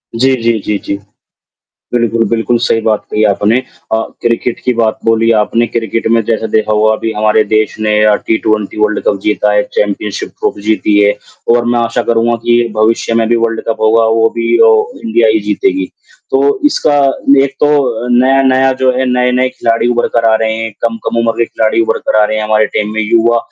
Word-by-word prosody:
जी, 130 +2 +2
जी, 115 -1 +1
जी, 105 - -1
जी। 100 - -3 1.0
बिल्कुल, 115 -1 +1
बिल्कुल 115 +1 0
सही 115 - +1
बात 110 -1 0
कही 105 - 0
आपने 105 +3 +2 0.3
अ, - - +3 0.3
क्रिकेट 120 0 -1
की 125 - +1
बात 110 -1 0
बोली 115 0 +2
आपने, 115 +3 0
क्रिकेट 115 -1 -3
में 115 0 +3
जैसे 110 0 -2
देखा 110 0 0
होगा 110 +1 +2
अभी 110 0 -3
हमारे 110 +1 +2
देश 110 0 -1
ने 105 0 0
अ, 105 - +4
टी 110 - -1
20 105 -1 -1
वर्ल्ड 105 0 0
कप 100 - +1
जीता 105 - 0
है, - - +2
चैंपियनशिप - - -2
ट्रॉफी 425 -2 -4
जीती 105 -1 +1
है 105 0 +3 0.4
और 120 - +1
मैं 120 - +1
आशा 115 +1 -1
करूँगा 115 +1 +1
कि 120 0 +2
भविष्य 115 +1 +1
में 115 -1 +1
भी 120 - +2
वर्ल्ड 115 -1 -2
कप 115 - -2
होगा, 115 +1 +3
वो 115 0 +2
भी 115 0 +1
ओ - - +5 0.3
इंडिया 115 - +2
ही 110 0 +2
जीतेगी, 95 -2 0 0.4
तो 140 +1 +1
इसका 150 - +1 0.5
एक 135 -1 -5
तो 130 -6 +1
नया-नया 135 0 +3
जो 130 -1 +3
है, 130 - 0
नए-नए 125 +1 +1
खिलाड़ी 115 -1 -1
उभर 120 0 +1
कर 115 - +1
आ 110 - +3
रहे 110 0 0
हैं, 115 0 -4 0.2
कम-कम 115 0 -3
उम्र 115 -1 +1
के 115 - +2
खिलाड़ी 110 0 -1
उभर 110 - -1
कर - - +2
आ - - +4
रहे 110 +1 -2
हैं 110 - -2
हमारे 110 0 +2
टीम 105 0 -1
में, 110 - -1
युवा 115 +2 +2
115 Hz, 205 wpm, -12 LUFS, 110-120 Hz, 1.0 s, ओ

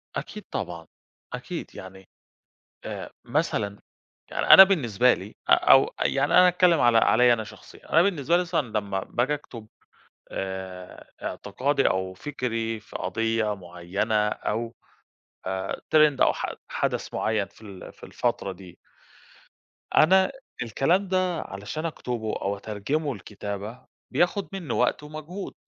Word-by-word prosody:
أكيد - - -6
طبعًا، 85 -2 -5 0.5
أكيد - - -6
يعني 95 0 -11 0.8
آآ، - - -6
مثلًا 100 0 -1 0.5
يعني - - -2
أنا 190 - +11
بالنسبة 125 - +3
لي 100 +3 -10
آآ، - - +6
أو - - +5
يعني 140 +1 +1
أنا 180 - +8
هاتكلم 180 -2 +4
على 120 -1 +5
عليّ 120 +2 +5
أنا 110 -2 0
شخصيًا، - - -15
أنا 165 - +6
بالنسبة 170 -4 +1
لي 180 - +2
مثلًا 150 -11 -1
لَمّا 100 -2 -3
باجى 130 +5 0
أكتُب 115 -7 -10 0.6
آآ، 95 -1 -7
اعتقادي 140 +1 0
أو 95 0 -2
فِكْري 115 -3 -3
في - - -9
قضية 115 +2 -1
مُعيّنة 100 +4 -1
أو 115 +2 -3 0.7
آآ، 95 +1 -3 0.2
trend 150 -3 +5
أو - - +5
ح - - -4
حَدْث - - -2
مُعيّن 110 -3 0
في - - -22
ال 100 -4 -11
في - - -21
الفترة 100 - -2
دي 90 -1 -13 1.2
أنا 190 - +5 0.3
الكلام 165 - +1
ده 185 -2 0
علشان 105 +12 -6
أكتبه 120 -8 -3
أو 100 +1 -1
أترجمه 125 +8 -3
لكتابة، 100 +2 -7 0.3
بياخد 190 +3 +1
مني 175 -10 -4
وقت 125 +4 +1
ومجهود، 155 +6 -7
115 Hz, 135 wpm, -25 LUFS, 100-155 Hz, 1.2 s, أنا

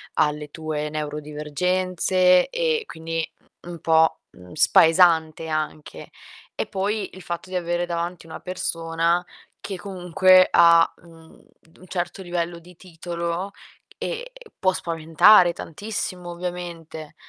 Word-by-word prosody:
alle 150 0 0
tue 155 -1 -4
neurodivergenze 170 +5 +1
e 485 -2 0
quindi 165 - -4 0.4
un 175 -1 -8
po', 160 0 +3
mhmm, 90 0 -16
spaesante 165 -1 +4
anche. 155 -1 -5 0.5
E - - -2
poi 200 +1 -2
il 185 - -11
fatto 175 +2 -6
di 185 - -6
avere 175 0 -1
davanti 170 0 -4
una 160 - -9
persona 170 -1 -1 0.4
che 195 - -5
comunque 185 0 +4
ha 170 0 +6
un 165 -1 -17 0.3
d 165 - -25
un 185 - -16
certo 175 +1 -4
livello 175 -1 -3
di 175 +2 -17
titolo 170 +1 -5 0.5
e - - -5 0.3
può 185 -1 +2
spaventare 170 +2 +4
tantissimo 185 0 -5
ovviamente. 170 -3 -7
170 Hz, 120 wpm, -23 LUFS, 160-185 Hz, 0.5 s, ha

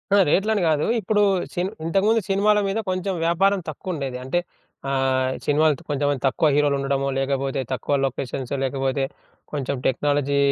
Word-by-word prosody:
ఆ! - - +6
రేట్లని 210 +4 +2
గాదు. 155 -2 +2
ఇప్పుడు 210 +1 +1 0.3
సిన్ 180 +2 -1 0.2
ఇంతకుముందు 205 +6 +2
సినిమాల 210 +2 +3
మీద 195 +3 -1
కొంచెం 185 +1 -1
వ్యాపారం 195 +4 +3
తక్కువుండేది. 145 -5 -4
అంటే 155 +7 0 0.5
ఆహ్, 130 -1 +1 0.2
సినిమాలు 150 +1 +3
కొంచెం 145 0 0 0.2
తక్కువ 135 +4 +2
హీరోలు 145 -1 +3
ఉండడము, 135 0 0
లేకపోతే 135 0 -1
తక్కువ 130 +2 -2
లొకేషన్స్, 135 0 -3
లేకపోతే 135 0 -1 0.5
కొంచెం 140 -2 -2
టెక్నాలజీ 140 +1 +1
145 Hz, 135 wpm, -23 LUFS, 135-185 Hz, 0.5 s, ఆ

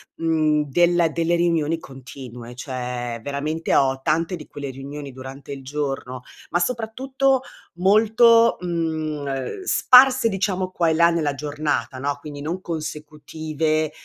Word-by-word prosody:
mhmm, 155 -2 +1
del 175 +2 +3
delle 170 +1 +1
riunioni 165 -2 +1
continue, 130 -4 -10
cioè, 125 -2 -4
veramente, 145 +5 -2
ho 135 -1 +3
tante 165 +5 0
di 150 - -11
quelle 145 -1 -6
riunioni 140 +2 -8
durante 130 +2 -10
il 140 -1 -6
giorno, 135 -2 -4 0.3
ma 175 - +2
soprattutto, 255 +5 0 0.4
molto, 225 +4 +5
mhmm, 170 -2 -1 0.4
ehm, 135 - -4
sparse, 260 -8 +6
diciamo, 190 -2 -1
qua 175 -2 0
e - - +2
là 170 +1 +5
nella 160 -4 0
giornata, 145 -4 -2
no, 140 +2 -2
quindi 145 -1 -8
non 170 +5 -4
consecutive, 155 -1 -3
155 Hz, 130 wpm, -22 LUFS, 140-175 Hz, 0.4 s, sparse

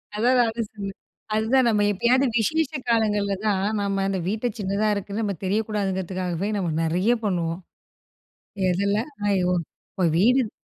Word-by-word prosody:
அதான் 245 +4 +3
நானும் 225 -1 -1
சொன்னேன். 200 -2 -7 0.4
அதுதான் 240 +3 +3
நம்ம 210 -2 +2
எப்பயாவது, 250 +7 +3
விசேஷ 315 +6 +1 0.2
காலங்கள்ல 210 -3 +2
தான் 195 -2 +1 0.2
நாம, 195 -1 0
அந்த 190 -1 -1
வீட்ட 220 +4 -2
சின்னதா 200 +2 0
இருக்குன்னு, 200 +2 -3
நம்ம 200 -3 -1
தெரியக்கூடாதுங்கிறதுக்காகவே, 190 -3 -1
நம்ம 180 -4 -1
நெறையா 180 +9 +2
பண்ணுவோம். 170 -2 -1 1.1
எதுல? 200 +3 +1 0.3
ஐயோ! 180 -2 +2 0.4
இப்போ 185 - -3
வீடு 245 +8 +4
இரு 215 - -5
205 Hz, 135 wpm, -24 LUFS, 190-225 Hz, 1.1 s, வீடு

